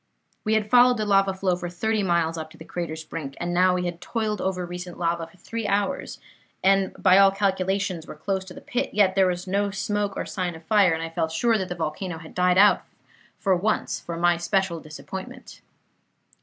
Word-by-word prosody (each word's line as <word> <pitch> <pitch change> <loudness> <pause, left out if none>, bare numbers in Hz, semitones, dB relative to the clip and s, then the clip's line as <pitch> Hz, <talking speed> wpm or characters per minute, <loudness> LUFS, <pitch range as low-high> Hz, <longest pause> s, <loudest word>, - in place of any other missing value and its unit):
"We 220 0 +1
had 215 -1 +1
followed 245 0 +6
the 215 - -1
lava 195 -1 +3
flow 190 -1 0
for 175 0 -5
thirty 215 +5 -1
miles 170 -3 +1
up 160 -1 -6
to 160 - -16
the 160 - -11
crater's 165 -2 -5
brink, 140 -3 -6
and 175 0 -2
now 180 +1 +4
we 180 0 -1
had 175 -1 -4
toiled 215 -3 -2
over 185 -1 -1
recent 180 0 -7
lava 170 -1 -1
for 165 - -21
three 225 +4 -5
hours, 205 +8 -1 0.4
and, 195 0 +3
by 185 +1 +5
all 195 0 +8
calculations, 190 -3 -1
were - - -8
close 190 +5 -2
to 180 - -11
the - - -10
pit; 245 -4 -3
yet 200 -3 +4
there 190 -1 +4
was 180 0 -2
no 200 +2 0
smoke 205 0 -2
or - - -2
sign 180 -3 -3
of 160 - -12
fire, 195 -1 +4
and 160 0 -3
I 165 - -4
felt 165 -1 -1
sure 230 +7 +2
that 190 -4 -2
the 180 - -3
volcano 165 +2 -3
had 160 -1 -12
died 180 0 +2
out 205 +1 +6 0.6
for 195 -2 +2
once 210 +5 -1
for 170 -1 -6
my 175 0 +3
special 175 0 0
disappointment. 190 - -9
185 Hz, 215 wpm, -25 LUFS, 170-200 Hz, 0.6 s, all